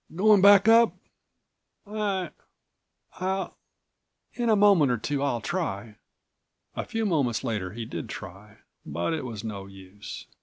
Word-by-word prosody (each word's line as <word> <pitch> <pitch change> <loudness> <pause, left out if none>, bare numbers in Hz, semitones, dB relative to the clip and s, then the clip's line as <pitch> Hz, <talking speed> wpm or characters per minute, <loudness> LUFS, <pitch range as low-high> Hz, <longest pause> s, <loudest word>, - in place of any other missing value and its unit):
"Going 205 +2 +5
back 200 +1 +7
up?" 230 0 +6 0.9
"I—I'll—In 195 +2 -6
a 220 - +5
moment 200 -9 +5
or 120 - +1
two 140 +5 -3
I'll 130 -5 -1
try." 110 - -4 0.8
A - - -3
few 225 0 -2
moments 140 - 0
later 100 -5 -3
he 115 +1 -6
did 115 0 -6
try, 105 +1 -10 0.3
but 85 - -3
it 155 -4 -3
was 115 -4 -6
no 100 -3 -6
use. 95 +1 -10
140 Hz, 125 wpm, -26 LUFS, -, 0.9 s, back